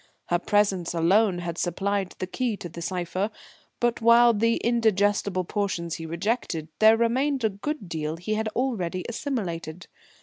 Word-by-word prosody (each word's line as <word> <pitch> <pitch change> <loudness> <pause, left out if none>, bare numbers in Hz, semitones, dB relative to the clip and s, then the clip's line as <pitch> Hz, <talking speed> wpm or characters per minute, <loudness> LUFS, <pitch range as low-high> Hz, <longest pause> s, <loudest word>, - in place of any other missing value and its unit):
Her 175 - +2
presence 195 -4 +1
alone 185 +4 +3
had 170 -1 -4
supplied 195 +2 -1
the - - -3
key 225 +3 -2
to 175 - -7
the 170 0 -9
cipher. 185 +3 -2 0.5
But 240 0 0
while 235 +1 +6
the 230 +2 +2
indigestible 205 -5 +1
portions 175 -4 -2
he 165 - -7
rejected, 170 -2 -2
there 220 +1 +7
remained 255 +4 +1
a 220 - +3
good 210 +3 -5
deal 160 -1 -3
he 180 +5 -3
had 220 +1 -1
already 185 -9 -1
assimilated. 180 - -4
200 Hz, 155 wpm, -26 LUFS, 175-230 Hz, 0.5 s, there